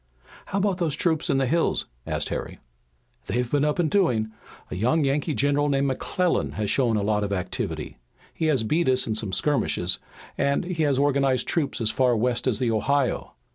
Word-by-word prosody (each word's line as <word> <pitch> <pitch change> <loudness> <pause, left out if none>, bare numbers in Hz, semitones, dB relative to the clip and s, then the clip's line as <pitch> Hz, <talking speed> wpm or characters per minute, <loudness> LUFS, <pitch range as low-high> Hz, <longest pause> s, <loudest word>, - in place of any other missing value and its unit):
"How 195 - -2
about 195 -2 +1
those 160 -5 0
troops 160 -1 0
in - - +2
the 135 - +2
hills?" 165 +6 +1 0.2
asked - - -2
Harry. - - -4 0.7
"They've 125 0 -1
been 145 -1 +2
up 150 0 +1
and 175 -2 +2
doing. 120 - +2 0.4
A - - -3
young 125 - +2
Yankee 145 +2 0
general 145 +1 +2
named 140 0 +1
McClellan 170 +6 0
has 105 -2 -1
shown 120 -5 +2
a 105 - 0
lot 105 0 +1
of 100 - -3
activity. 90 -9 -3 0.3
He 160 - -2
has 135 -7 +2
beat 155 +7 +1
us 130 0 +2
in 110 - -1
some 110 -2 -2
skirmishes 95 - +1 0.4
and 140 0 +1
he 175 -2 -3
has 145 -3 +2
organized 135 -2 +2
troops 150 -6 -1
as 110 -2 +1
far 125 -3 +2
west 125 +2 0
as 120 -5 +2
the 120 0 0
Ohio. 135 +4 0
135 Hz, 195 wpm, -25 LUFS, 115-150 Hz, 0.7 s, in